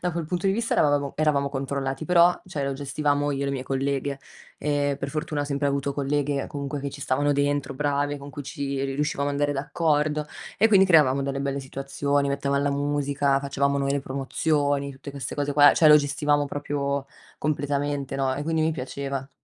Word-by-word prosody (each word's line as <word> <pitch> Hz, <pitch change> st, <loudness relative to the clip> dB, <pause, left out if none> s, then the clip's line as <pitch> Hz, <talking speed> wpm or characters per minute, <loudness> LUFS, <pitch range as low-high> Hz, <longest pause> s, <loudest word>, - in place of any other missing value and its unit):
da 180 Hz, -, 0 dB
quel 170 Hz, -1 st, -3 dB
punto 180 Hz, +4 st, -2 dB
di 195 Hz, -, +3 dB
vista 230 Hz, +2 st, -1 dB
eravamo 145 Hz, -2 st, +2 dB
eravamo 145 Hz, -2 st, +1 dB
controllati, 135 Hz, +1 st, -3 dB
però, 175 Hz, 0 st, +5 dB
cioè 150 Hz, -6 st, -3 dB
lo 140 Hz, -, -1 dB
gestivamo 145 Hz, +1 st, 0 dB
io 140 Hz, 0 st, -2 dB
e -, -, -1 dB
le 140 Hz, -, -1 dB
mie 135 Hz, -2 st, -3 dB
colleghe, 135 Hz, +1 st, -2 dB, 0.4 s
e 145 Hz, -1 st, 0 dB
per 140 Hz, 0 st, -4 dB
fortuna 155 Hz, -1 st, -2 dB
ho -, -, -3 dB
sempre 140 Hz, 0 st, -1 dB
avuto 140 Hz, 0 st, -1 dB
colleghe, 140 Hz, 0 st, -1 dB
comunque 140 Hz, -1 st, -5 dB
che 140 Hz, -, -3 dB
ci 140 Hz, 0 st, -8 dB
stavano 145 Hz, +3 st, +1 dB
dentro, 140 Hz, -1 st, 0 dB
brave, 145 Hz, +1 st, 0 dB
con 140 Hz, 0 st, -10 dB
cui 145 Hz, -, -7 dB
ci 140 Hz, -1 st, -3 dB
riuscivamo 140 Hz, +1 st, -1 dB
ad 140 Hz, -, -2 dB
andare 145 Hz, 0 st, +1 dB
d'accordo, 150 Hz, +1 st, 0 dB, 0.3 s
e 225 Hz, -, +5 dB
quindi 195 Hz, -3 st, +5 dB
creavamo 145 Hz, -6 st, +5 dB
delle 140 Hz, 0 st, -2 dB
belle 140 Hz, 0 st, -2 dB
situazioni, 140 Hz, +1 st, -1 dB
mettevamo 140 Hz, 0 st, 0 dB
la 145 Hz, -, +1 dB
musica, 140 Hz, -1 st, +1 dB
facevamo 140 Hz, 0 st, 0 dB
noi 140 Hz, 0 st, 0 dB
le 140 Hz, -, +1 dB
promozioni, 140 Hz, +1 st, -1 dB
tutte 135 Hz, +1 st, -9 dB
queste 140 Hz, -1 st, -6 dB
cose 145 Hz, -1 st, -1 dB
qua, 145 Hz, 0 st, +7 dB
cioè 160 Hz, -, +5 dB
lo 150 Hz, -, +9 dB
gestivamo 145 Hz, 0 st, +1 dB
proprio 140 Hz, -1 st, -2 dB, 0.3 s
completamente 145 Hz, -2 st, -2 dB
no, 135 Hz, -1 st, 0 dB
e 145 Hz, -, -4 dB
quindi 160 Hz, 0 st, 0 dB
mi 160 Hz, -, +1 dB
piaceva. 135 Hz, -1 st, -5 dB
140 Hz, 200 wpm, -25 LUFS, 140-145 Hz, 0.4 s, lo